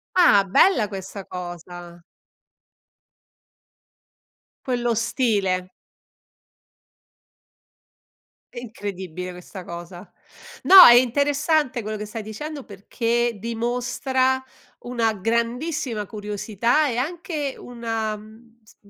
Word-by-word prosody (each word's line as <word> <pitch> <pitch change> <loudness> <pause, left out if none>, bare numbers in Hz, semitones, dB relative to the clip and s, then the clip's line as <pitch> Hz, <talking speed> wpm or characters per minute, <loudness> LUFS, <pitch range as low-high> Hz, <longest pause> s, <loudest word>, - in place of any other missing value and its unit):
Ah, 345 - +6
bella 210 - +3
questa 195 0 -8
cosa. 175 -1 -9 2.6
Quello 240 -2 0
stile. 205 -6 0 2.8
È 240 - -6
incredibile 190 -6 -7
questa 180 +1 -10
cosa. 175 +2 -9 0.5
No, 380 -1 +11
è 240 - +10
interessante 280 +2 +2
quello 215 0 -5
che 210 - -5
stai 215 +2 -6
dicendo, 285 +7 -7
perché 230 +3 -2
dimostra 250 +3 -1 0.4
una 235 -2 -1
grandissima 235 - -2
curiosità 215 +7 -1
e 240 - -3
anche 300 +1 -3
una, 225 -3 -4
mhmm, 225 +2 -16
s 215 - -22
230 Hz, 85 wpm, -23 LUFS, 200-255 Hz, 2.8 s, No